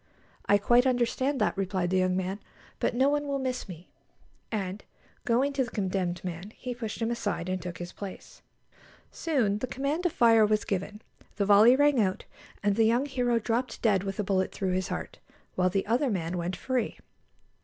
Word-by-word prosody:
"I 205 - +6
quite 240 +5 +4
understand 260 +2 +1
that," - - +2
replied 185 -2 -1
the 190 - +3
young 185 0 +1
man; 190 +2 -2 0.4
"but - - 0
no 260 +3 +4
one 290 0 0
will 280 -1 -1
miss 255 -5 -3
me"; 175 0 -10 0.6
and, 200 -2 -3 0.4
going 255 +4 +2
to 270 -1 +1
the 245 - -6
condemned 185 -4 -2
man, 180 +4 -6
he 250 -1 -5
pushed 230 -1 -5
him 225 - 0
aside, 205 -7 -2
and 185 0 -2
took 175 -1 -6
his 175 0 -7
place. 195 -2 -9 0.7
Soon 240 -11 0
the 255 - -3
command 275 +5 -2
to 360 - +1
fire 230 -6 +5
was 215 0 +2
given. 205 +2 -3 0.3
The 200 - 0
volley 210 +5 +7
rang 285 -3 +4
out, 190 0 -1 0.4
and 205 -1 +2
the 225 - +5
young 240 +5 +2
hero 245 -4 0
dropped 235 +3 -2
dead 205 -5 +3
with 195 0 -5
a - - +1
bullet 190 -1 0
through 190 -2 -2
his 185 0 -1
heart, - - -5 0.3
while 185 0 +2
the 195 +1 -1
other 250 +6 +1
man 180 -4 -2
went 175 +1 -2
free. 250 +4 -2
210 Hz, 195 wpm, -28 LUFS, 185-250 Hz, 0.7 s, volley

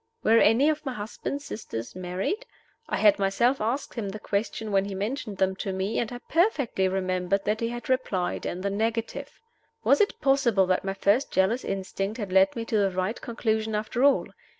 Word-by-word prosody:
Were 230 +1 +5
any 235 +7 +5
of 310 -1 0
my 265 -3 -3
husband's 235 +6 -5
sisters 115 - -6
married? 185 - -3 0.4
I - - 0
had 205 0 +5
myself 225 +7 +2
asked 235 +6 -2
him 215 -5 -3
the 210 +2 -6
question 210 +1 -2
when 195 -1 +2
he 200 -1 -5
mentioned 210 0 -3
them 190 0 +1
to 195 - -3
me, 190 +3 -1
and 235 - -2
I 245 - -5
perfectly 295 - +2
remembered 185 +1 -1
that 215 +1 0
he 230 - -1
had 240 0 -6
replied 215 -9 -1
in 180 - -4
the 200 +1 -1
negative. 225 +2 -2 0.4
Was - - +4
it 405 - +1
possible 260 -8 +3
that 185 0 +1
my 195 0 -3
first 205 +8 +2
jealous 195 +7 +2
instinct 195 +2 -3
had 205 -5 -5
led 190 +1 +4
me 230 -1 -3
to 225 - 0
the 200 -1 +3
right 185 +4 -2
conclusion 220 -2 -1
after 215 +4 -1
all? 280 0 +4
215 Hz, 195 wpm, -26 LUFS, 195-240 Hz, 0.4 s, Were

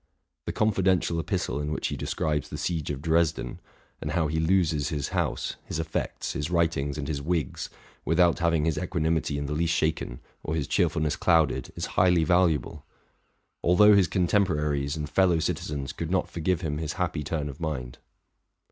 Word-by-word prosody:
The - - 0
confidential 95 -5 +1
epistle 70 -3 -2
in 75 +1 -3
which - - -2
he - - -3
describes 75 -3 -2
the - - -5
siege 80 -4 -2
of 70 -1 -4
Dresden, 80 -1 +1 0.4
and 75 - -3
how 80 -2 +2
he 80 +1 -1
loses 80 -4 +2
his 75 -3 -2
house, - - -2
his - - -5
effects, 80 0 -3
his 75 +2 -3
writ 85 -1 +2
ings, 70 +1 -2
and 75 - -4
his 75 -3 -2
wigs, 80 -2 -2 0.3
without 85 +1 +3
having 85 -3 +2
his 80 -2 0
equanimity 80 -4 0
in 70 - -2
the 75 - -3
least 85 +2 +1
shaken 80 -6 -1 0.2
or 80 - -2
his 75 -4 -1
cheerfulness 75 -1 +1
clouded, 80 -3 +2
is - - -3 0.2
highly 90 -2 +4
valuable; 80 -4 +1 0.8
although 105 +4 +6
his 95 -3 +4
contemporaries 75 -6 +1
and 75 -1 -3
fellow 90 +3 +3
citizens 70 -3 -2
could 85 - -4
not 95 +1 +1
forgive 85 +1 0
him 75 -3 -2
his 80 -2 -3
happy 85 -4 -2
turn 75 0 -2
of 70 +1 -8
mind. 65 -7 -4
80 Hz, 175 wpm, -27 LUFS, 75-85 Hz, 0.8 s, although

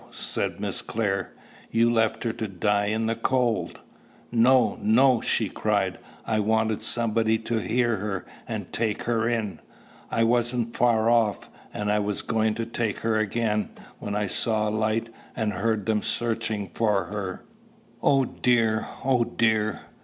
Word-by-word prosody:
said - - -2
Miss - - 0
Clare: 100 -4 -2 0.4
"you 115 +1 +3
left 110 -1 +1
her 115 -2 -1
to 110 - -4
die 100 +2 0
in 110 +2 0
the 115 +1 0
cold." 120 -1 0 0.5
"No, 120 -1 +4
no!" 120 +3 +4
she - - +1
cried. - - -1 0.3
"I 110 -1 0
wanted 110 0 +1
somebody 110 0 +1
to 115 +1 -2
hear 115 +3 +1
her, 95 -1 -4 0.2
and - - -5
take 110 -2 -1
her 115 -1 +1
in. 110 -5 -2 0.5
I 115 - +1
wasn't 120 0 +1
far 115 -1 +3
off, 115 -3 +1 0.2
and 105 0 -3
was 105 -1 -2
just - - -20
going 110 -1 +1
to 115 - -3
take 115 -2 -2
her 110 -1 +1
again, 110 0 0 0.3
when 105 - -4
I 105 0 0
saw 110 +2 0
a - - -1
light, 110 +1 0 0.3
and 110 -2 -1
heard 105 +2 -1
them 110 0 +1
searching 110 -5 -1
for 105 -3 +1
her. 100 -3 -5 0.6
Oh, 135 -2 +4
dear! 115 -3 +1 0.2
Oh, 130 -3 +3
dear!" 110 -2 0
110 Hz, 155 wpm, -25 LUFS, 105-115 Hz, 0.6 s, No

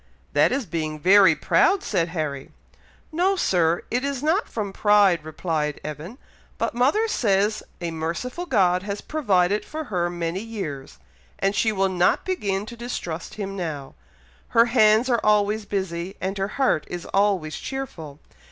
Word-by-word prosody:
"That - - +4
is 270 -2 -1
being 155 -4 -3
very 195 +4 +6
proud!" 395 -1 +2
said 175 -5 0
Harry. 155 -5 -4 0.6
"No, 365 +5 +2
Sir! 175 - +1
it 245 +2 0
is 280 -1 -3
not 330 +8 +1
from 205 -3 -4
pride," 200 -6 +4
replied 155 -1 -2
Evan; 155 - -7 0.4
"but - - -1
mother 280 - +2
says 210 - +1 0.2
a 170 -1 -3
merciful 170 - -4
God 180 - +3
has 200 +1 -4
provided 205 -9 +1
for 315 0 -6
her 175 -1 +1
many 175 +1 -3
years, 160 - -6 0.4
and 195 +1 +1
she 220 +2 +2
will 195 -2 +1
not 180 -1 +1
begin 205 - -1
to 235 - -9
distrust 205 -9 -5
Him 195 -2 -5
now. 155 -7 -5 0.5
Her 230 -1 +4
hands 220 -1 +4
are 240 -3 +1
always 210 0 +2
busy, 190 -2 -4
and 190 +1 -3
her 195 - 0
heart 265 - +1
is 175 -1 -6
always 195 -6 +1
cheerful. 180 - -6
195 Hz, 155 wpm, -24 LUFS, 170-235 Hz, 0.6 s, very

